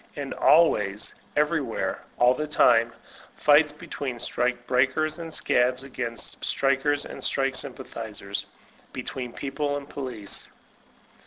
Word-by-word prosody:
And 140 -2 -4
always, 105 -11 +3 0.2
everywhere, 150 -5 0 0.2
all 125 +1 +5
the 150 +4 -3
time, 120 -5 +4 0.4
fights 150 0 +5
between 140 -3 -5
strike 120 +1 -1
breakers 135 +6 +1
and 165 -1 -6
scabs 125 -3 +2
against 120 -4 -4
strikers 140 +1 +2
and - - -7
strike 135 -1 +1
sympathizers, 110 -7 -5 0.5
be - - -5
tween 125 -2 -5
People 145 +2 -2
and 140 -1 -8
Police. 125 -8 -6
135 Hz, 115 wpm, -26 LUFS, 120-145 Hz, 0.5 s, all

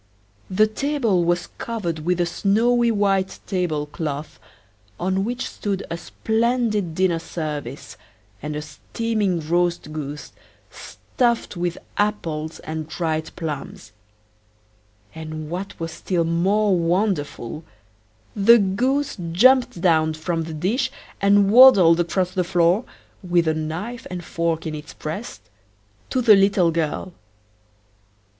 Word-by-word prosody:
The 200 +3 +4
table 225 -5 0
was 175 +1 0
covered 190 -9 -3
with 180 +3 -1
a 175 - +3
snowy 235 +7 +2
white 195 -3 +1
table 175 -7 -1
cloth, 150 0 -5 0.6
on 190 +2 0
which 245 +4 -3
stood 200 -2 -4
a 170 - -2
splendid 220 -4 -1
dinner 185 -2 +2
service, 155 -3 -6 0.4
and 150 +1 -4
a 150 - -4
steaming 185 +2 -2
roast 175 -2 0
goose, 150 -1 -6 0.4
stuffed 235 -4 -2
with 175 -1 -2 0.2
apples 165 -7 -2
and 155 0 -5
dried 160 -1 -2
plums. 145 -9 -6 1.2
And 155 -1 -7
what 190 +3 -5
was 165 0 -4
still 175 0 -1
more 190 +5 +2
wonderful, 165 - -1 0.7
the 225 +3 +7
goose 250 +8 0 0.2
jumped 245 0 +4
down 160 -3 +3
from 165 +1 -2
the 160 - -7
dish 205 - 0 0.3
and 200 0 +4
waddled 200 -9 +8
across 180 +1 0
the 185 -1 0
floor, 175 +4 +2 0.4
with 175 -3 +1
a 160 - +3
knife 160 +10 -5
and 180 -2 -6
fork 165 0 -2
in 160 - -3
its 150 0 -8
breast, 165 +10 -6 0.7
to 255 -2 0
the 220 -3 +8
little 195 -3 +3
girl. 165 +3 -2
175 Hz, 125 wpm, -22 LUFS, 160-210 Hz, 1.2 s, waddled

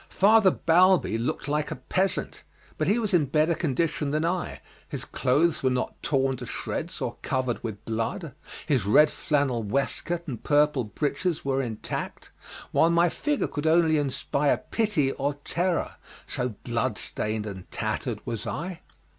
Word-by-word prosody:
Father 210 0 +5
Balbi 180 - +4
looked 150 +6 -2
like 150 +1 0
a 160 - -3
peasant, 190 +3 -1 0.4
but 155 - +1
he 205 +5 +3
was 220 -5 -1
in 165 -5 +4
better 155 +4 +2
condition 155 -1 -1
than 155 +3 0
I, 175 +1 -2 0.3
his - - -5
clothes 150 +5 +1
were 130 - +3
not 125 0 -1
torn 135 -2 +1
to 125 -1 -7
shreds - - -4
or - - -3
covered 130 -3 -1
with 110 -4 -6
blood, 115 +7 -3 0.3
his 135 - +1
red 150 +8 +6
flannel 140 -6 0
waistcoat 140 - -2
and 120 -6 -6
purple 145 -4 +3
breeches 150 - -2
were 135 0 +1
intact, 115 -4 -5 0.4
while 165 - +4
my 170 +1 +4
figure 295 - -1
could 145 +1 -3
only 160 -1 +4
inspire 145 0 +1
pity 205 -12 +2
or 140 +1 -2
terror, 175 0 0 0.3
so 125 -3 -3
bloodstained 110 -2 -2
and 95 -3 -8
tattered - - -3
was 115 0 -4
I. 170 +9 -4
150 Hz, 155 wpm, -26 LUFS, 125-170 Hz, 0.4 s, red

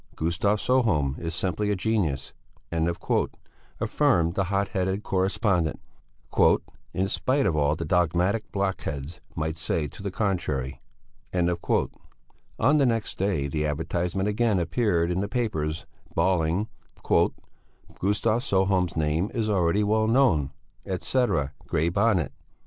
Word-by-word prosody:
"Gustav 85 +6 +1
Sjöholm 100 - +1
is 80 -1 -4
simply 95 +4 -1
a 105 - +2
genius," 95 -10 -1 0.4
affirmed 85 0 0
the 100 +1 0
hot 100 +1 0
headed 95 +2 -1
correspondent, 95 -3 +1 1.1
"in 95 +1 0
spite 135 +7 +1
of 80 - +2
all 75 0 +2
that 85 +1 -4
dogmatic 90 +5 +1
blockheads 85 -6 -3
might 80 +1 -2
say 75 0 -1
to - - -12
the 100 - -2
contrary." 85 - -2 0.5
On 90 - -1
the 140 - +4
next 115 -2 -1
day 95 -8 0
the 75 +2 -1
advertisement 85 +5 -1
again 105 0 +2
appeared 85 0 +1
in 90 - -1
all - - 0
the 100 - -1
papers, 80 -10 -2 0.3
bawling: 90 +3 +2 0.4
"Gustav 100 - -1
Sjöholm's 95 -6 +1
name 80 +5 +1
is 110 -2 0
already 95 +1 +2
well 110 +1 +2
known, 110 - +3 0.3
etc. 95 - 0
(Grey 80 +3 +1
Bonnet)." 100 -2 +2
90 Hz, 120 wpm, -26 LUFS, 80-105 Hz, 1.1 s, the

